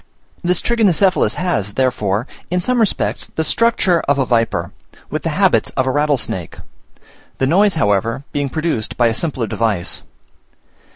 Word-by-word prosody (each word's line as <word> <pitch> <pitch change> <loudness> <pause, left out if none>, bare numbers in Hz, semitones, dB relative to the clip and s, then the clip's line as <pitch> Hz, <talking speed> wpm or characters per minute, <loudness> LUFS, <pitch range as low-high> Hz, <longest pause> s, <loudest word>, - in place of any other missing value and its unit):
This 180 +1 +2
Trigonocephalus 200 -5 +2
has, 110 - -1
therefore, 115 -4 0 0.2
in 180 +1 0
some 250 +7 0
respects 220 -3 0
the 160 - 0
structure 195 -2 +2
of 140 0 +2
a 135 - +1
viper, 115 -2 0 0.4
with - - -2
the - - -2
habits - - +3
of 130 - +2
a 130 - +1
rattlesnake: 140 - -1 0.8
the 135 - +1
noise, 190 +7 +3
however, 115 -1 0
being 145 -1 -1
produced 155 -7 -2
by 120 - +3
a - - -1
simpler 135 -3 -2
device. 105 -4 -1
140 Hz, 150 wpm, -18 LUFS, 115-180 Hz, 0.8 s, habits